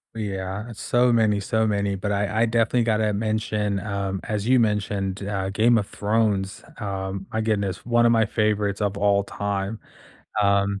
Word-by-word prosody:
Ooh -, -, -5 dB
yeah 95 Hz, +1 st, -4 dB
it's 115 Hz, -, -9 dB
so 125 Hz, 0 st, +3 dB
many, 110 Hz, -3 st, +3 dB
so 110 Hz, +2 st, 0 dB
many, 100 Hz, -1 st, 0 dB
but 100 Hz, +2 st, -3 dB
I 105 Hz, +2 st, 0 dB
I -, -, +5 dB
definitely 115 Hz, +1 st, +2 dB
gotta 110 Hz, -2 st, +1 dB
mention, 105 Hz, -1 st, -1 dB
um, 100 Hz, -1 st, -3 dB
as 105 Hz, 0 st, -3 dB
you 130 Hz, 0 st, +5 dB
mentioned, 100 Hz, -3 st, -1 dB
uh, 95 Hz, -2 st, -2 dB
Game 115 Hz, +4 st, +3 dB
of 100 Hz, -3 st, -1 dB
Thrones, 105 Hz, -2 st, 0 dB, 0.2 s
um, 95 Hz, -2 st, -4 dB
my 110 Hz, -, -1 dB
goodness, 100 Hz, -4 st, -1 dB
one 120 Hz, 0 st, +3 dB
of 115 Hz, -, +5 dB
my 115 Hz, -1 st, +4 dB
favorites 105 Hz, -2 st, 0 dB
of 100 Hz, -1 st, -1 dB
all 100 Hz, 0 st, +3 dB
time. 100 Hz, +1 st, -3 dB, 0.6 s
Um, 100 Hz, 0 st, +2 dB
105 Hz, 180 wpm, -24 LUFS, 100-110 Hz, 0.6 s, I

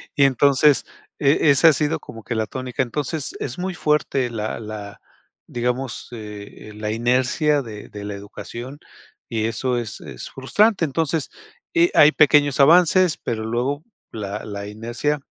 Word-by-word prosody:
y 140 Hz, -, +4 dB
entonces, 140 Hz, +2 st, +4 dB, 0.3 s
e 145 Hz, +1 st, +3 dB
esa 140 Hz, +4 st, +6 dB
ha 155 Hz, -, +4 dB
sido 150 Hz, +3 st, 0 dB
como 115 Hz, -2 st, -11 dB
que 120 Hz, -, -3 dB
la 110 Hz, -, 0 dB
tónica. 130 Hz, 0 st, -3 dB
Entonces, 145 Hz, +4 st, -3 dB
es 120 Hz, -, -5 dB
muy 185 Hz, 0 st, -2 dB
fuerte 150 Hz, -5 st, 0 dB
la 110 Hz, -2 st, -4 dB
la 105 Hz, -2 st, -8 dB, 0.5 s
digamos, 125 Hz, +1 st, -3 dB
eh, 105 Hz, -2 st, -9 dB
eh, -, -, -12 dB
la 105 Hz, 0 st, -4 dB
inercia 130 Hz, +6 st, +1 dB
de 105 Hz, -4 st, -9 dB
de 105 Hz, -1 st, -8 dB
la 105 Hz, -, -5 dB
educación, 115 Hz, +7 st, -9 dB, 0.5 s
y 110 Hz, -1 st, -1 dB
eso 125 Hz, +2 st, -1 dB
es 115 Hz, -3 st, -5 dB
es -, -, -8 dB
frustrante. 200 Hz, +9 st, +2 dB
Entonces, 155 Hz, +1 st, -1 dB, 0.4 s
y 345 Hz, 0 st, +4 dB
hay 150 Hz, +1 st, +8 dB
pequeños 145 Hz, -2 st, +4 dB
avances, 175 Hz, +3 st, +5 dB
pero 110 Hz, -2 st, -4 dB
luego, 125 Hz, +6 st, -2 dB, 0.3 s
la 105 Hz, 0 st, -5 dB
la 100 Hz, -1 st, -6 dB
inercia, 120 Hz, +7 st, -3 dB
130 Hz, 155 wpm, -22 LUFS, 110-150 Hz, 0.5 s, hay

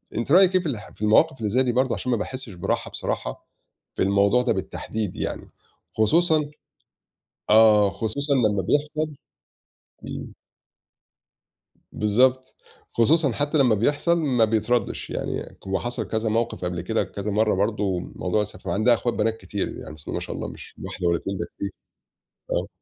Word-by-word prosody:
أنتِ 120 Hz, +5 st, -2 dB
رأيِك 185 Hz, +1 st, +7 dB
في 175 Hz, -, -11 dB
الح 110 Hz, -6 st, -5 dB
في -, -, -20 dB
المواقِف 130 Hz, +8 st, +4 dB
اللي 105 Hz, -2 st, -1 dB
زي 130 Hz, +5 st, +3 dB
دي 125 Hz, -, +1 dB
برضه 130 Hz, +1 st, +1 dB
عشان 125 Hz, -, -3 dB
ما 120 Hz, -, +2 dB
باحسش 130 Hz, +3 st, -5 dB
براحة 85 Hz, -, -2 dB
بصراحة -, -, -4 dB, 0.5 s
في -, -, -3 dB
الموضوع 100 Hz, +4 st, +3 dB
ده 125 Hz, -2 st, +1 dB
بالتحديد 100 Hz, +1 st, -4 dB
يعني، -, -, -4 dB, 0.5 s
خصوصًا 155 Hz, +6 st, +3 dB, 1.0 s
آه 105 Hz, -2 st, +6 dB
خصوصًا 115 Hz, +8 st, -1 dB
لمّا 105 Hz, -7 st, +2 dB
بيحصل 150 Hz, +5 st, 0 dB, 0.9 s
إمم. -, -, -7 dB, 1.6 s
بالضبط، 125 Hz, +5 st, +2 dB, 0.4 s
خصوصًا 145 Hz, +4 st, +4 dB
حتى 145 Hz, +4 st, 0 dB
لمّا 125 Hz, -6 st, +4 dB
بيحصل 145 Hz, -, +2 dB
ما 125 Hz, -8 st, +3 dB
بيتردش، 115 Hz, +2 st, 0 dB
يعني -, -, -4 dB
هو 95 Hz, -, 0 dB
حصل 120 Hz, 0 st, -4 dB
كذا 110 Hz, 0 st, -1 dB
موقِف 115 Hz, -4 st, -1 dB
قبل 90 Hz, -1 st, -2 dB
كده 110 Hz, +5 st, 0 dB
كذا 100 Hz, +1 st, -5 dB
مرّة 110 Hz, 0 st, +2 dB
برضه، 100 Hz, -2 st, 0 dB, 0.2 s
موضوع 95 Hz, +4 st, 0 dB
الس 105 Hz, -, -7 dB
عندها 110 Hz, +4 st, +3 dB
اخوات 120 Hz, +1 st, 0 dB
بنات 115 Hz, 0 st, 0 dB
كتير 95 Hz, +1 st, -4 dB
يعني 75 Hz, -, -9 dB
بسم 75 Hz, -, -9 dB
الله -, -, -4 dB
ما -, -, -1 dB
شاء -, -, -6 dB
الله، -, -, -4 dB
مش -, -, -11 dB
واحدة 90 Hz, -1 st, -3 dB
والَّا 85 Hz, -1 st, +2 dB
2، 95 Hz, 0 st, -4 dB
ده 85 Hz, -, -2 dB
كتير، 100 Hz, -1 st, -3 dB, 0.8 s
آه. -, -, 0 dB
110 Hz, 165 wpm, -24 LUFS, 100-130 Hz, 1.6 s, رأيِك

